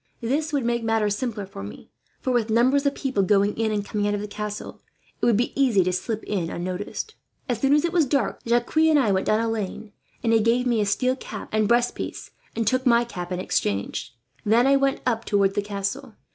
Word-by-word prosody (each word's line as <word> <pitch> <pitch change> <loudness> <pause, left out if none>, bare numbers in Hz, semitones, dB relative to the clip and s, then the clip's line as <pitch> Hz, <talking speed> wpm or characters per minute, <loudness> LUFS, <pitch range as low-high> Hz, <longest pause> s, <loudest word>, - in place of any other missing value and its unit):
This 290 +7 -1
would 280 -5 0
make 235 0 0
matters 220 -2 +1
simpler 215 -3 -3
for 190 - -9
me 100 +1 -10 0.3
for, 260 - -1
with 235 -2 +1
numbers 260 +6 +3
of 280 - 0
people 260 -7 -1
going 200 +1 +2
in 220 -1 0
and 205 -1 -1
coming 205 0 -1
out 205 - +1
of - - -3
the 210 - -5
castle, 210 0 -6 0.4
it - - +2
would 230 -4 +4
be 240 - 0
easy 245 -9 +3
to 180 +1 0
slip 215 +4 -3
in 180 -6 -2
unnoticed. 185 - -4 0.3
"As 245 -4 -1
soon 275 +1 +4
as 300 - +2
it 340 - -2
was 330 -5 +3
dark, 275 +2 0
Jacques 235 +3 0
and 315 -1 +5
I 245 -8 +3
went 190 0 0
down 215 - +3
a 230 - 0
lane; 215 -1 -4 0.3
and 230 -1 +2
he 225 - +5
gave 230 +3 +2
me 240 -3 +2
his 205 -1 +1
steel 255 +5 +1
cap - - -8
and 215 -1 +2
breast 240 +1 +3
piece, - - -6 0.2
and 230 - -1
took 255 +2 +1
my 235 -1 +5
cap 180 -6 -7
in 180 - -2
exchange. 100 - -2 0.3
Then 230 +4 +4
I 275 +1 +5
went 275 0 +1
up 230 -2 0
towards 200 -2 +2
the 205 - 0
castle. 205 +5 -4
225 Hz, 235 wpm, -24 LUFS, 205-255 Hz, 0.4 s, and